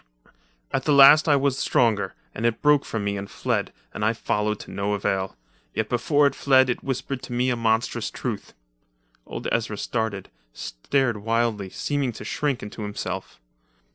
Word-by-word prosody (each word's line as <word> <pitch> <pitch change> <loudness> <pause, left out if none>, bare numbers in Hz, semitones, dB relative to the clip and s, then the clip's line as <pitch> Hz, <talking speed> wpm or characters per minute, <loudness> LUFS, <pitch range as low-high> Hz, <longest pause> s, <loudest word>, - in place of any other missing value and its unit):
"At 135 - -1
the 150 - +3
last 145 +3 +8
I 145 - +6
was 140 -1 +1
stronger, 105 -5 +1 0.2
and 110 - -5
it 115 -1 0
broke 150 -1 +4
from 110 -2 -3
me 100 0 -1
and 100 0 -6
fled, - - -1 0.2
and 105 - -4
I 110 +2 +3
followed 105 -2 -1
to - - -11
no 100 +1 -1
avail. 95 -1 -1 0.4
Yet 110 -1 -1
before 145 +4 +2
it 140 - +3
fled 130 -2 +4
it - - -5
whispered 135 0 -3
to - - -7
me 125 +1 +1
a - - +1
monstrous 115 -1 0
truth." - - -5 0.7
Old - - -5
Ezra 115 -2 -1
started, 110 -3 -3 0.2
stared 120 - -1
wildly, 115 -2 0
seemed 140 +1 -2
to - - -8
shrink 145 -4 -1
into 105 +1 -7
himself. 105 0 -5
115 Hz, 170 wpm, -24 LUFS, 105-135 Hz, 0.7 s, last